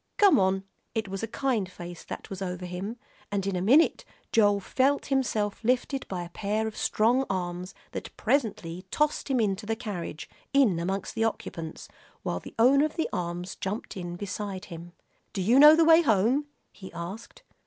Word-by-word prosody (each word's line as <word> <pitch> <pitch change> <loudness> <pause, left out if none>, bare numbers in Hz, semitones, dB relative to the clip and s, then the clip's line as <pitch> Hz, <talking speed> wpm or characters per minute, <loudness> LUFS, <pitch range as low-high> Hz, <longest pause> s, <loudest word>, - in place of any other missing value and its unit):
"Come 405 - +6
on." 190 0 +2 0.3
It 220 -2 -1
was 195 0 -4
a 225 - -2
kind 225 -5 -1
face 175 -1 -9
that - - -8
was 195 0 -6
over 180 -1 -4
him, 185 +6 -5 0.3
and 200 -2 -1
in 195 -1 -1
a 180 - -1
minute 270 - +4 0.3
Joel 205 -2 +4
felt 270 +8 +1
himself 220 -6 0
lifted 255 +3 0
by 180 -2 -4
a 170 - -9
pair 210 +4 -1
of 220 -1 -4
strong 240 +5 +2
arms 180 -1 -3 0.2
that - - -7
presently 185 - -1
tossed 300 +3 0
him 260 -2 +2
into 205 -1 0
the 225 - 0
carriage, 200 -9 -6 0.3
in 245 -12 +4
amongst 190 +3 -2
the 225 - 0
occupants, 165 -7 -4 0.4
while 90 - -2
the - - -12
owner 265 +5 +5
of 310 - -4
the 325 - -1
arms 175 -1 -3
jumped 195 +3 -4
in 175 -2 -5
beside 195 0 -5
him. 170 0 -10 0.4
"Do 195 - -2
you 235 +8 +5
know 300 +2 +10
the 330 0 +4
way 325 +1 +7
home?" 245 - +2 0.2
he 190 - -11
asked. 185 +7 -8
205 Hz, 185 wpm, -28 LUFS, 180-245 Hz, 0.4 s, know